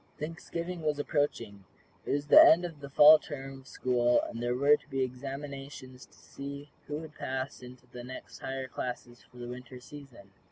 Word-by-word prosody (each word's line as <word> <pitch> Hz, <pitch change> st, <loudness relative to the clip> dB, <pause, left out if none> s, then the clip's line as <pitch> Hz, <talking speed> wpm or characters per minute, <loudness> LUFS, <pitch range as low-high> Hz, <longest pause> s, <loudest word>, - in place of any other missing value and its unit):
Thanksgiving 170 Hz, +2 st, -5 dB
was 150 Hz, -2 st, 0 dB
approaching. 145 Hz, -, -2 dB, 0.4 s
It -, -, -1 dB
was 145 Hz, 0 st, -1 dB
the 145 Hz, -, +9 dB
end 175 Hz, +2 st, +6 dB
of 165 Hz, -4 st, -8 dB
the 140 Hz, -1 st, -9 dB
Fall 150 Hz, +3 st, +8 dB
term 135 Hz, -1 st, -8 dB
of 135 Hz, -, -18 dB
school, 120 Hz, -2 st, +2 dB
and 115 Hz, -, -6 dB
there 120 Hz, 0 st, 0 dB
were 140 Hz, +3 st, +5 dB
to 150 Hz, -, -15 dB
be 135 Hz, -2 st, 0 dB
examinations 135 Hz, 0 st, -7 dB
to -, -, -24 dB
see 140 Hz, +1 st, -9 dB, 0.2 s
who 150 Hz, -, -3 dB
would 155 Hz, -1 st, -9 dB
pass 130 Hz, -1 st, -5 dB
into 125 Hz, 0 st, -13 dB
the 125 Hz, 0 st, -10 dB
next 130 Hz, +1 st, -10 dB
higher 130 Hz, 0 st, -5 dB
classes 120 Hz, -2 st, -6 dB
for 125 Hz, -, -18 dB
the 120 Hz, 0 st, -7 dB
Winter 125 Hz, +1 st, -9 dB
season. 125 Hz, -6 st, -13 dB
135 Hz, 190 wpm, -30 LUFS, 125-145 Hz, 0.4 s, the